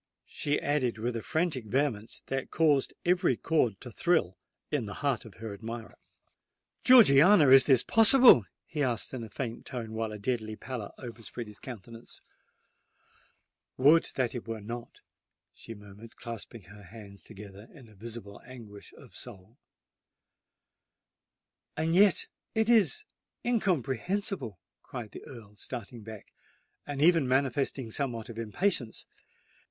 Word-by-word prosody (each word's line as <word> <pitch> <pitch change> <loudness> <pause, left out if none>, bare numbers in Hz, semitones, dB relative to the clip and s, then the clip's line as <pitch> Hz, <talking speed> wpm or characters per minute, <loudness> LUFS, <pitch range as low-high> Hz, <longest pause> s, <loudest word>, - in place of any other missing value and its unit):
she 145 0 -2
added 135 -5 0
with 120 +2 -3
a 115 - -3
frantic 155 -6 -1
vehemence 115 -2 -2
that 135 0 -3
caused 150 -4 +2
every 175 -8 +2
chord 125 -11 0
to 125 - -9
thrill 160 - +1 0.4
in 140 -8 -1
the 100 - -7
heart 135 -5 0
of 110 - -13
her 110 -1 -7
admirer. 115 +2 -7 0.9
"Georgiana, 180 - +7
is 135 0 +8
this 130 -5 +4
possible?" 225 - +7 0.2
he 150 - -4
asked, 125 -3 -1
in 125 -3 -5
a 110 - -9
faint 115 +2 -5
tone, 115 -3 -6
while 110 -1 -3
a 105 - -6
deadly 110 0 -3
pallor 120 -3 -6
overspread 120 -1 -8
his 105 -1 -13
countenance. 115 -1 -11 1.6
"Would 150 +5 +5
that 125 -3 0
it 120 -2 -7
were 115 -1 -4
not!" 115 +3 -8 0.5
she 115 - -10
murmured, 105 +2 -14
clasping 115 -2 -8
her 100 +3 -14
hands 100 0 -12
together 105 0 -12
in 125 -8 -16
visible 110 -1 -8
anguish 115 -5 -12
of - - -16
soul. 105 +8 -11 2.2
"And 160 +2 0
yet 200 0 +5 0.3
it 220 +1 +2
is 215 - +4 0.4
incomprehensible!" 185 - -1 0.2
cried 110 -4 -8
the - - -10
Earl, 110 -5 -12
starting 120 0 -8
back, 110 -1 -11 0.5
and 145 0 -2
even 165 -4 +4
manifesting 130 -2 0
somewhat 120 -3 -3
of 115 -1 -8
impatience. 115 - -1
120 Hz, 135 wpm, -29 LUFS, 110-145 Hz, 2.2 s, is